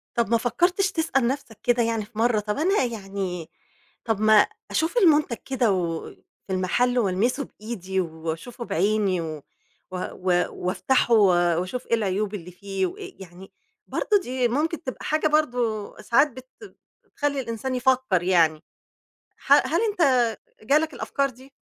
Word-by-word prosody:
طَب 235 -2 +1
ما 230 - +5
فكّرتش 350 - +1
تسأل 315 -7 +1
نَفْسك 255 -4 -4
كده 240 -1 +3
يعني 225 -2 -1
في 215 0 -18
مرّه، 230 -1 +3
طَب 210 0 -3
أنا 365 +3 +2
يعني، 195 -7 -4 0.6
طَب 225 -3 0
ما 215 -1 +6 0.2
أشوف 320 +9 0
المُنتَج 305 - +4
كده 250 -5 +1
و 170 -3 -2 0.4
في 190 - -3
المحَل 245 +7 +1
وألمِسه 225 +7 +1
بإيدي 190 -6 -5
وأشوفه 165 +9 -5
بعيني 200 -1 +1
و 155 -2 -6 0.5
و 185 - -4 0.2
و 180 -1 +1
وأفتَحه 235 +7 +1
و 215 -3 +6 0.3
وأشوف 185 +8 -5
إيه - - -1
العيوب 205 -1 -1
اللي 180 -3 -7
فيه 195 +1 -3
وإيه 185 - -8
يعني، 185 +1 -12 0.4
برضه 415 -1 +1
دي 255 0 0
ممكن 310 +7 -1
تبقى 260 - -6
حاجة 310 0 +1
برضه 245 -9 0
ساعات 275 +5 +4
بت 255 +1 -12 0.6
بتخلّي 285 -1 -2
الإنسان 245 +1 -3
يفكّر 250 -8 +2
يعني، 165 -4 +3 0.8
ح - - -1
هل - - +4
أنت 365 - -1 0.6
جالك 300 +6 +2
الأفكار 275 +2 -1
دي؟ 260 +3 -17
230 Hz, 150 wpm, -24 LUFS, 190-265 Hz, 0.8 s, ما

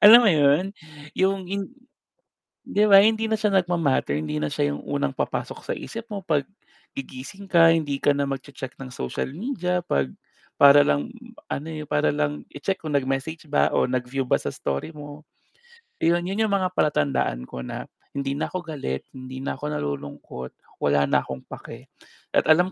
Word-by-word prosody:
Alam 230 +4 +12
mo 205 - +6
'yon, 150 +2 +4 0.5
yung 190 -1 +1
in 200 +4 -3 0.9
'di 210 +1 +2
ba, 195 - +10
hindi 220 +1 +3
na 220 - +2
siya 210 -2 +1
nagma-matter, 165 - +2
hindi 75 0 -3
na 75 - -1
siya 70 0 0
yung - - -7
unang 70 -1 -1
papasok - - -3
sa - - -3
isip 230 0 -7
mo 200 -1 -4
'pag 150 -3 +2 0.5
gigising 135 +9 -8
ka, 165 -3 +6
hindi 145 -4 -1
ka - - +5
na 140 0 0
magche-check 135 -1 -6
ng 130 - -7
social 95 - -3
media 180 - -1
'pag 70 -2 +1 0.5
para 145 0 +9
lang 70 0 +1 0.4
ano, 145 +3 -3
eh, 155 -1 -6
para 75 - +2
lang 75 0 -1
i-check 190 +7 -3
kung 155 -2 -3
nag-message 140 +4 -1
ba 145 - +3
o - - +3
nag-view 130 +1 -2
ba - - +3
sa - - -2
story 70 - -3
mo. 145 -1 -10 0.8
'Yon, 170 +1 +3
yun 195 +4 -3
yung 205 - -3
mga 185 -1 +1
palatandaan 65 - +1
ko 65 - -7
na - - -5 0.3
hindi 140 0 -1
na 150 - -1
ako 185 -1 -4
galit, 135 - -4
hindi 130 0 -8
na - - -2
ako 150 - -3
nalulungkot, 70 -3 -5 0.3
wala 70 0 +4
na - - +4
akong 65 -1 -7
pake. - - -9 0.5
At - - +3
alam 175 +4 +5
145 Hz, 180 wpm, -25 LUFS, -, 0.9 s, Alam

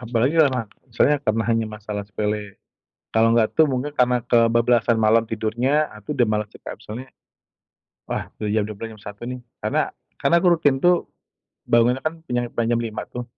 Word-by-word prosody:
Apalagi 120 +3 0
kelama 130 -6 +2 0.3
soalnya 150 0 +4
karena 110 -4 0
hanya 115 -1 +1
masalah 105 -1 -6
sepele. 105 -1 -3 0.6
Kalau 115 0 +4
nggak 115 -2 +2
tuh 160 -1 +6
mungkin 140 +3 -2
karena 125 -1 +3
kebablasan 115 0 +3
malam 110 +1 +4
tidurnya, 120 +8 +1
ah, 105 - -13
tuh 150 - -3
udah 120 - +4
malas 105 -1 -1
sih - - -14
Kak, - - -9
soalnya, 120 +5 -7 1.0
wah - - -4
udah 105 - -2
jam 105 0 +1
12.00 110 +1 -7
jam 105 - -18
1.00 105 +4 -9
nih. 125 0 -5 0.2
Karena - - 0 0.3
karena 170 - +3
aku 180 - +2
rutin 145 -4 +2
tuh, 175 +3 +2 0.5
bangunnya 120 +3 +3
kan 155 +1 -1
pinjam 120 -1 0
pan 115 -1 -1
jam 120 - +2
5.00 110 - -5
tuh. 125 0 -6
115 Hz, 185 wpm, -22 LUFS, 110-125 Hz, 1.0 s, tuh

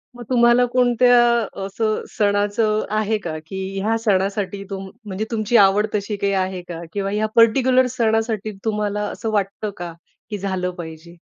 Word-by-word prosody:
मग 240 - -9
तुम्हाला 240 0 +5
कोणत्या 245 0 +3 0.5
असं 215 +2 -1
सणाचं 205 +1 +1
आहे 215 0 +1
का, 165 -6 -5
की 190 +2 -5
ह्या 225 +2 +1
सणासाठी 195 -1 0
तुम 195 -1 -6 0.2
म्हणजे 205 +1 -3
तुमची 220 +1 +2
आवड 205 +1 +5
तशी 205 +1 -2
काही 200 0 0
आहे 185 -1 -1
का? 175 -1 -8
किंवा 195 -1 -2
ह्या 210 +1 0
परटिक्युलर 255 +2 +5
सणासाठी 220 -2 0
तुम्हाला 210 -1 -1
असं 225 - -4
वाटतं 205 +1 -1
का 175 -1 -6 0.4
की 210 - -3
झालं 190 -2 -2
पाहिजे? 165 0 -9
210 Hz, 155 wpm, -21 LUFS, 195-225 Hz, 0.5 s, तुम्हाला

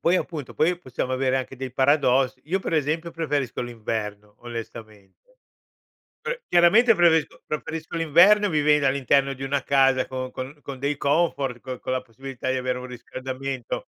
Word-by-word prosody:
Poi 175 +2 +3
appunto, 145 -9 -4
poi 170 - +2
possiamo 130 -3 -4
avere 130 0 +1
anche 130 0 -6
dei 130 -1 -6
paradossi. 130 -2 +2
Io 185 +5 0
per 165 - -3
esempio 160 +3 -1
preferisco 145 -8 -2
l'inverno, 105 -3 -5
onestamente. 115 - -10 0.8
Eh, - - -4
chiaramente 210 +7 +5
preferisco 165 -4 +2
preferisco 160 +2 -5
l'inverno 180 +7 +5
vivendo 150 -2 +3
all'interno 140 0 +2
di 135 - -10
una 135 0 -1
casa 135 -2 +3
con 130 -1 -5
con 130 +4 -7
con 135 -2 -7
dei 140 +2 -1
comfort 140 -4 0
con 130 -2 -6
con 130 - -3
la 130 - 0
possibilità 130 +2 -6
di 130 - 0
avere 125 0 -2
un 125 - -7
riscaldamento. 130 +1 -5
135 Hz, 160 wpm, -24 LUFS, 130-160 Hz, 0.8 s, chiaramente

